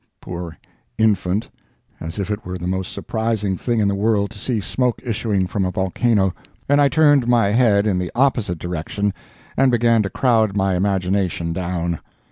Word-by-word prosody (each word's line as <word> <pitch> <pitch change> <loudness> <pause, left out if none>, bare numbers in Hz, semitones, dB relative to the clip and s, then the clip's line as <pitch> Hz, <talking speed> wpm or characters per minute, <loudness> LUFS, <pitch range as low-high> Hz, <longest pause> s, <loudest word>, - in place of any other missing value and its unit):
(poor 85 -2 -7 0.4
infant—as 100 -4 -2
if 100 +1 -3
it 105 +1 -3
were 90 0 -5
the 90 - -6
most 95 0 -2
surprising 110 -4 -2
thing 120 +4 -1
in 105 - +2
the 100 - +1
world 100 0 +1
to 100 - -11
see 120 +1 -1
smoke 125 +4 -1
issuing 110 -5 0
from 95 +2 -2
a 90 - 0
volcano), 95 +1 +1 0.3
and 145 +1 +4
I 140 - +5
turned 145 -3 +4
my 120 -4 +3
head 105 -2 +3
in 95 -4 +1
the 90 -1 -3
opposite 120 -9 +1
direction 90 +4 -3 0.4
and 135 -1 +4
began 115 -1 +3
to 100 - -2
crowd 110 -2 +2
my 95 -1 +1
imagination 95 -2 0
down. 85 -2 -2
100 Hz, 170 wpm, -20 LUFS, 90-115 Hz, 0.4 s, I